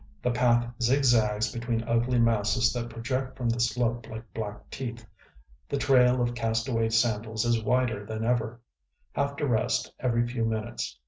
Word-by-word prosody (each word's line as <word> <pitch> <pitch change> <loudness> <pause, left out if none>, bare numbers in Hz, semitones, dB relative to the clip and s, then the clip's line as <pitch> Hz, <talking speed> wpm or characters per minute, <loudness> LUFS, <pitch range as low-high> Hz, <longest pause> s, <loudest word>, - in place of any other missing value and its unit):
The 125 - +2
path 120 0 +3 0.2
zigzags 115 -4 +3
between 115 -1 -2
ugly 120 +2 +1
masses 115 0 +2
that 120 -1 -3
project 130 +3 -3
from 120 -2 -1
the 115 +1 0
slope 120 0 0
like 110 +1 -7
black 105 -2 -6
teeth. 120 -4 -6 0.6
The 140 - 0
trail 125 -2 +4
of 120 0 -1
cast 115 0 -1
away 115 -3 +1
sandals 110 0 +1
is 120 -1 +2
wider 120 -2 +1
than 110 +1 -4
ever.... 120 -1 0 0.5
Have 140 0 -1
to 145 0 -1
rest 115 -4 0
every 120 -2 +1
few 120 -1 -2
minutes.... 110 - -3
120 Hz, 165 wpm, -27 LUFS, 110-125 Hz, 0.6 s, trail